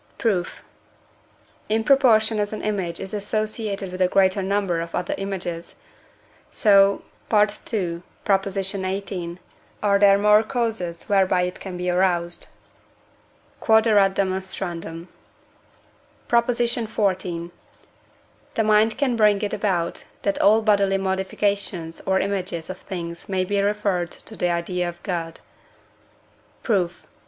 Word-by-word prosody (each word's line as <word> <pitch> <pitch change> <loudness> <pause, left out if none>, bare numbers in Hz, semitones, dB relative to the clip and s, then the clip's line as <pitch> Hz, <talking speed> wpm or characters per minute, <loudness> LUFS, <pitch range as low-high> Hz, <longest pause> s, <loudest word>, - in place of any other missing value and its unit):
Proof. 190 -6 -1 1.1
In 220 +1 +1
proportion 225 -5 +4
as 205 0 -1
an 215 - -5
image 190 -5 -2
is 190 +1 -7
associated 210 -1 -3
with 185 +1 -5
a 185 - +5
greater 190 +1 +3
number 190 -3 0
of 170 0 -6
other 180 - -2
images, 175 -4 -5 0.7
so 200 -2 +4 0.3
(II. 210 -2 +6 1.4
xviii.) 185 -2 -4 0.5
are 200 -1 +3
there 200 -1 +6
more 210 +1 +5
causes 220 -8 -3
whereby 190 -2 +3
it 180 0 -4
can 185 -2 -7
be 180 0 -3
aroused. 175 -1 0 1.2
Q.E.D. 220 0 +4
PROP. 190 +3 -2
XIV. 205 -8 -1 1.0
The 225 - +2
mind 215 +1 +3
can 260 -4 +1
bring 210 -3 +4
it 205 - -2
about, 175 -5 -1 0.2
that 200 - 0
all 215 +2 +5
bodily 200 -2 +3
modifications 190 -2 -2
or 190 0 +3
images 185 -4 -3
of 185 - -9
things 170 -1 -7
may 185 -1 0
be 200 +1 0
referred 200 -4 0
to - - -6
the 180 - 0
idea 175 +1 -1
of 175 0 -12
God. 170 -4 -4 1.2
Proof. 180 -6 -1
195 Hz, 115 wpm, -23 LUFS, 180-210 Hz, 1.4 s, II